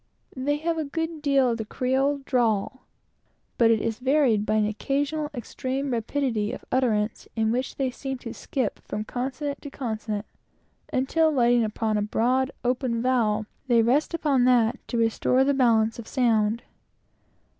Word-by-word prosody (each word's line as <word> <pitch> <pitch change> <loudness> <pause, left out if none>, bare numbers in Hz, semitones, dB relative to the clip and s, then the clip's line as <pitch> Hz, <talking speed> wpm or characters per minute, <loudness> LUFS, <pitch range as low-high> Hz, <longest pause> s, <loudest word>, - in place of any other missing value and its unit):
They 285 +3 0
have 330 +2 -1
a - - 0
good 325 +2 -4
deal 275 -4 +3
of 230 - -3
the - - -1
Creole 265 +5 0
drawl, 240 0 0 0.7
but 230 -1 +6
it 225 -1 +4
is 225 +1 -2
varied 255 -6 +2
with 215 +1 +2
an 215 - +3
occasional 285 +7 -1
extreme 265 +1 -4
rapidity 230 -2 -1
of - - -8
utterance, 225 -4 0
in 220 -1 +1
which 250 +2 -2
they 265 -2 -1
seem 270 +1 -5
to 230 - -5
skip 255 -7 -3
from 210 - -5
consonant 265 +5 -4
to 285 - -7
consonant, 220 -5 -4 0.7
until, 315 +5 +2
lighting 240 -3 +3
upon 215 0 -1
a - - +1
broad, 250 +5 +1 0.2
open 245 -1 0
vowel, 220 -4 +1 0.2
they 235 -2 +4
rest 280 +8 +2
upon 280 -6 +2
that 245 -1 +3
to 240 - -2
restore 230 +3 +2
the 280 +1 +2
balance 230 -4 +2
of 230 - -8
sound. 230 -2 +1
250 Hz, 160 wpm, -25 LUFS, 225-275 Hz, 0.7 s, but